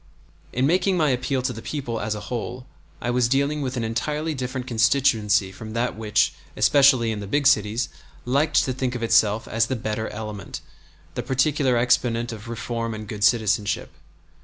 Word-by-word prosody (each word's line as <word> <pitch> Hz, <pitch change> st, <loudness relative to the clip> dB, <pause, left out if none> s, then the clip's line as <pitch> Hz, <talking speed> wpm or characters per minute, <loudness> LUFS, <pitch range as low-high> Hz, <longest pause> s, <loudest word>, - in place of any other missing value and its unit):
In 125 Hz, +2 st, +1 dB
making 185 Hz, +4 st, +2 dB
my 155 Hz, -4 st, +3 dB
appeal 130 Hz, +1 st, -1 dB
to 130 Hz, 0 st, -1 dB
the 115 Hz, -, -8 dB
people 120 Hz, -6 st, -4 dB
as 110 Hz, 0 st, -2 dB
a 105 Hz, -, -6 dB
whole 125 Hz, +2 st, -5 dB, 0.3 s
I 120 Hz, -, -2 dB
was 120 Hz, -1 st, +2 dB
dealing 140 Hz, +3 st, +1 dB
with 130 Hz, -2 st, -3 dB
an 120 Hz, -, -1 dB
entirely 150 Hz, +8 st, -2 dB
different 130 Hz, -1 st, -4 dB
constituency 115 Hz, -5 st, +2 dB
from 110 Hz, +3 st, -9 dB
that 120 Hz, +2 st, -1 dB
which, 105 Hz, -1 st, +1 dB, 0.2 s
especially 135 Hz, -5 st, +5 dB
in 105 Hz, -, -3 dB
the 100 Hz, -, -6 dB
big 145 Hz, +7 st, 0 dB
cities, 115 Hz, -2 st, +3 dB, 0.4 s
liked 145 Hz, +5 st, +2 dB
to 130 Hz, -, -1 dB
think 130 Hz, -1 st, -2 dB
of 120 Hz, -, -4 dB
itself 110 Hz, -1 st, +3 dB
as 115 Hz, 0 st, +1 dB
the 130 Hz, -, -1 dB
"better 110 Hz, -1 st, -3 dB
element," 105 Hz, -2 st, -7 dB, 0.5 s
the -, -, -3 dB
particular 130 Hz, -1 st, +1 dB
exponent 120 Hz, -1 st, +1 dB
of 110 Hz, 0 st, -9 dB
reform 115 Hz, -1 st, -3 dB
and 110 Hz, -1 st, -8 dB
good 105 Hz, 0 st, -5 dB
citizenship. 105 Hz, -1 st, +1 dB
120 Hz, 180 wpm, -24 LUFS, 110-130 Hz, 0.5 s, especially